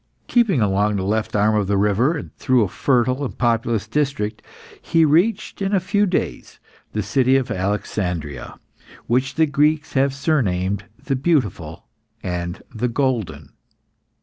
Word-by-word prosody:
Keeping 225 - +2
along 105 +1 +2
the 95 - -1
left 105 +3 -1
arm 105 +1 +3
of 105 -2 +1
the 100 0 +1
river 105 - +2
and - - -9
through 130 -3 +2
a - - 0
fertile 130 +6 +1
and 135 - -5
populous 115 -3 0
district, 115 -5 -1 0.4
he 165 -1 +3
reached, 175 +9 +1
in 195 +1 +1
a - - +4
few 200 +3 +1
days, 180 - -3 0.3
the 105 - -1
city 130 +7 +2
of 130 - -2
Alexandria, 90 - -3 0.5
which 130 +2 0
the 160 - +4
Greeks 150 +1 +1
have 135 0 +2
surnamed 100 - 0 0.2
the 135 - 0
Beautiful 120 - -1 0.4
and 90 0 -4
the 120 +2 -1
Golden. 115 - -2
120 Hz, 150 wpm, -21 LUFS, 100-145 Hz, 0.5 s, a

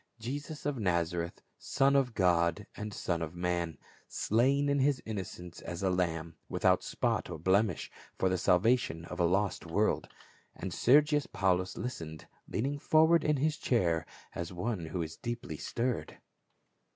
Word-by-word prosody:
Jesus 145 +7 -6
of 145 -4 -1
Nazareth, 85 -3 -1 0.2
Son 140 0 +2
of 130 -4 +2
God 90 +1 +2
and 105 0 -5
son 85 -4 -2
of 80 +1 -4
man, 85 -2 -1 0.3
slain 135 +6 +2
in 140 0 +2
his 135 0 +3
innocence, 90 -5 -6
as 85 +3 -5
a 95 - +2
lamb 85 -2 -1 0.2
without - - +3
spot - - -1
or - - -5
blemish, 95 +6 +1 0.3
for 95 - +2
the 95 - +2
salvation 90 -2 +2
of 90 +1 -7
a 85 - +4
lost 95 0 0
world. 105 +6 +1 0.5
And 95 - -5
Scrgius 145 - +4
Paulus 95 -1 +1
listened, 80 - -5 0.2
leaning 140 +6 -2
forward 160 +3 +4
in 150 -1 +2
his 155 +3 +1
chair 85 -9 +1 0.3
as 85 0 -4
one 90 -1 -3
who 85 +1 -2
is 80 0 -7
deeply 120 -10 -5
stirred. 120 +6 -2
95 Hz, 150 wpm, -31 LUFS, 85-130 Hz, 0.5 s, a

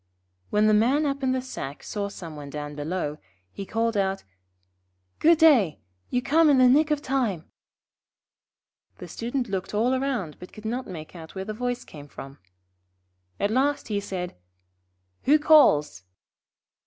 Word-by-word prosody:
When 210 +1 +2
the 215 - +4
Man 255 +8 +3
up 280 -1 -2
in 260 -1 +1
the 255 0 -1
sack 140 - -7
saw 200 -2 -4
some 165 -5 -9
one 145 -1 -8
down 145 0 -6
below, 150 0 -3 0.3
he 195 - -7
called 230 0 0
out: 195 -1 0 1.0
'Good 330 +1 +5
day. 265 - +5 0.3
You 250 0 -1
come 310 +4 +4
in 280 - +5
the 255 -1 +6
nick 295 +5 +4
of 300 -1 0
time.' 235 -11 -2 1.5
The - - -9
Student 245 +2 -3
looked 195 0 -4
all 240 +5 +2
round, 245 - -3
but 180 - -12
could 215 - -12
not 245 +4 -3
make 160 -1 -9
out 160 +1 -11
where 190 0 -4
the 215 - -4
voice 245 +2 -3
came 145 -2 -12
from. 135 0 -11 1.0
At 205 - 0
last 275 +3 0
he 205 -1 0
said: 185 -3 -5 0.9
'Who 295 +3 +6
calls?' 290 - +4
215 Hz, 160 wpm, -25 LUFS, 180-265 Hz, 1.5 s, the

